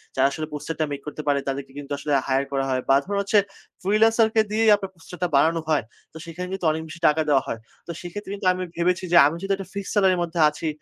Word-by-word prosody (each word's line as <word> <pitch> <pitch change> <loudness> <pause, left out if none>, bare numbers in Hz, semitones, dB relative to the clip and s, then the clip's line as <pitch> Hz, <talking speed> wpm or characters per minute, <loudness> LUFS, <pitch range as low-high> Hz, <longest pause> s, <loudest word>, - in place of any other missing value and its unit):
যারা 135 +1 +4
আসলে 155 +1 -4
poster 155 +2 -5
টা 155 - +2
make 140 -1 -5
করতে 150 +1 -5
পারে 140 -1 +3
তাদেরকে 135 0 -4
কিন্তু 145 0 -10
আসলে 150 - -4 0.2
hire 135 +1 +1
করা 135 -1 0
হয় 130 -1 0
বা 135 - +6
ধরুন 200 +1 -2
হচ্ছে 200 +1 +3 0.4
freelancer 220 +3 +4
কে 220 - +6
দিয়েই 220 +1 +3
আপনার 195 -2 -6
poster 170 +2 -12
টা - - +3
বানানো 165 +4 +3
হয়। 150 -5 +2 0.3
তো 160 - -9
সেখানে 175 +2 -6
কিন্তু 190 -3 -4
অনেক 160 +1 -3
বেশি 160 +2 -10
টাকা 150 +1 +3
দেওয়া 135 -2 +4
হয়। 115 - -4 0.3
তো - - -4
সেক্ষেত্রে 190 +3 -7
কিন্তু 195 -2 -3
আমি 185 - -4
ভেবেছি 180 +2 0
যে, 170 - +7
"আমি 150 - -3
যেহেতু 195 +2 -1
একটা 195 -1 -8
fixed 200 -1 -4
salary 190 -2 +4
এর - - -3
মধ্যে 170 0 -4
আছি, 150 +2 -6
165 Hz, 255 wpm, -24 LUFS, 145-195 Hz, 0.4 s, যে